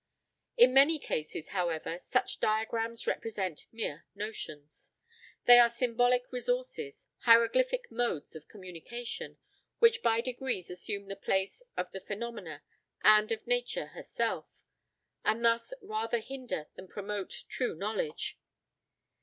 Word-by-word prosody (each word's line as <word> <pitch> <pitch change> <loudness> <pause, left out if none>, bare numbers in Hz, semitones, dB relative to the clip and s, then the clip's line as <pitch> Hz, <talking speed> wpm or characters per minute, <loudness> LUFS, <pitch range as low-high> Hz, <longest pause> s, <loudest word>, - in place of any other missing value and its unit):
In 250 +1 +7
many 280 +4 +6
cases, 155 - -4
however, 170 -2 -2
such - - 0
diagrams 225 +1 0
represent 190 -8 -2
mere 190 -9 -4
notions; 155 -8 -6 0.6
they 245 0 +10
are 240 -1 +8
symbolical 245 +1 +2
resources, 460 - -2
hieroglyphic 485 - +4
modes 230 -11 -1
of 155 - -10
communication, 205 +5 -7 0.4
which 465 0 +5
by 225 - +3
degrees 245 -6 -3
assume 200 +3 -4
the 195 0 -6
place 195 - -1 0.2
of 180 0 -2
the 190 - -7
phenomena 205 -7 -6 0.4
and 215 0 +6
of 225 - -2
Nature 245 0 -1
herself, - - -3 0.6
and 230 +2 +1
thus 230 - +3
rather 225 +2 -1
hinder 245 - -5
than 185 - -11
promote 205 0 -5
true 250 -8 -1
knowledge. 195 -4 -3
225 Hz, 120 wpm, -31 LUFS, 190-245 Hz, 0.6 s, they